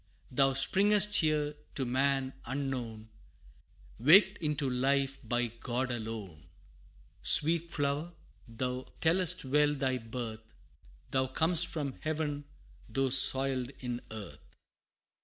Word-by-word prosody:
Thou 135 +1 +2
springest 205 +8 +3
here 150 -2 0 0.2
to 135 - 0
man 135 +1 0
unknown, 125 -5 -5 0.9
Waked 190 - +5
into 150 -3 -1
life 135 +2 0
by 120 0 -1
God 120 +2 -4
alone! 110 -9 -7 0.7
Sweet 165 +2 +4
flower 145 +3 -2 0.4
thou 125 +2 -5
tellest 180 0 +1
well 150 +2 +2
thy 130 -2 -1
birth, 115 -1 -8 0.6
Thou 130 0 +1
cam'st 160 +5 +2
from 145 -4 -4
Heaven, 150 -2 -3 0.4
though 135 +3 -1
soiled 130 -1 +5
in 125 -1 -4
earth! 100 -11 -11
135 Hz, 105 wpm, -30 LUFS, 120-150 Hz, 0.9 s, Waked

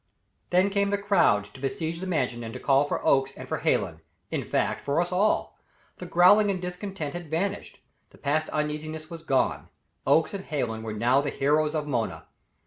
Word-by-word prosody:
Then 185 +3 +3
came 200 0 +1
the 205 - +1
crowd 195 - +2
to - - -12
besiege 160 +4 -3
the 190 - -5
Mansion 125 -9 -1
and 115 - -6
to - - -5
call 140 +1 +3
for - - -3
Oakes, 135 0 +3
and - - -8
for - - -2
Hallen; 80 - 0 0.3
in - - -1
fact, - - -1
for 140 +3 0
us 175 +1 0
all. 195 +4 +1 0.4
The 180 - -8
growling 195 +5 +6
and 190 -2 0
discontent 180 -4 -5
had 175 -3 -7
vanished; 195 +6 -2 0.3
the - - -19
past 155 +2 0
uneasiness 155 +1 -3
was 165 -1 -7
gone. 135 -5 0 0.4
Oakes 160 - +3
and 195 -1 -5
Hallen 120 -7 -2
were 110 -1 -5
now 120 +6 +3
the 145 - -2
heroes 150 +3 +1
of 150 -1 -1
Mona. 120 -6 -2
155 Hz, 195 wpm, -27 LUFS, 135-180 Hz, 0.4 s, growling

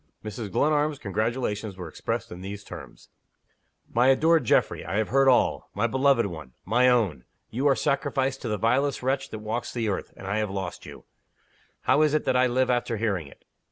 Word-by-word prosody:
Mrs. 105 -1 -5
Glenarm's 150 +4 +1
congratulations 110 -2 -2
were 90 -2 -6
expressed 80 - -4
in 90 - -8
these 100 +2 -7
terms: - - -11 0.8
"MY 120 +2 +4
ADORED 160 +2 +4
GEOFFREY, - - +2
I 90 +5 -3
have 110 - 0
heard 135 +1 +3
all. 125 - +2
My 105 +3 +1
beloved 130 0 +3
one! 80 -9 -7
my 125 +5 +4
own! 100 - +1 0.3
you 130 +6 0
are 135 - +4
sacrificed 135 -1 0
to - - -4
the 105 -1 -1
vilest 130 +7 +1
wretch 135 +1 0
that - - -6
walks 120 +3 -3
the 115 -3 -1
earth, 95 - -3
and - - -10
I 105 +3 -1
have 105 -1 -1
lost 95 -2 -5
you! - - -11 0.8
How 150 - +3
is 155 -1 +3
it 155 - 0
that - - +1
I 125 0 +4
live 130 +1 +1
after 120 -2 0
hearing 100 -8 -1
it? - - -18
120 Hz, 195 wpm, -26 LUFS, 100-135 Hz, 0.8 s, MY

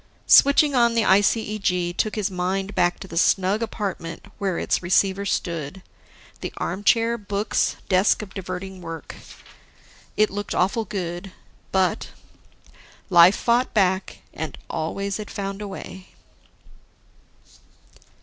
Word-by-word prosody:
Switching 280 +1 +6
on 235 -2 +3
the 230 - +3
ICEG 195 -3 +1
took 215 - -1
his 210 -2 -1
mind 190 +2 -2
back 175 0 +1
to - - -9
the 165 -2 -1
snug 195 +4 +2
apartment 195 -7 -4
where 195 -4 -1
its - - 0
receiver 190 +2 +2
stood, 170 -1 -3 0.6
the - - -5
armchair, 230 +5 +1
books, 205 +1 -1
desk 190 +3 +3
of 195 - -11
diverting 185 0 -6
work. 165 -1 -7 1.0
It 215 0 +3
looked 205 +1 -4
awful 200 +5 +1
good, 180 -1 -5 0.4
but... 190 -1 0 1.0
life 175 +2 +8
fought 240 +1 +1
back, 190 -2 +1
and 160 0 -6
always 200 +5 -3
it 210 - -7
found 195 0 -5
a 205 - -5
way. 190 -1 -9
195 Hz, 120 wpm, -23 LUFS, 180-210 Hz, 1.0 s, life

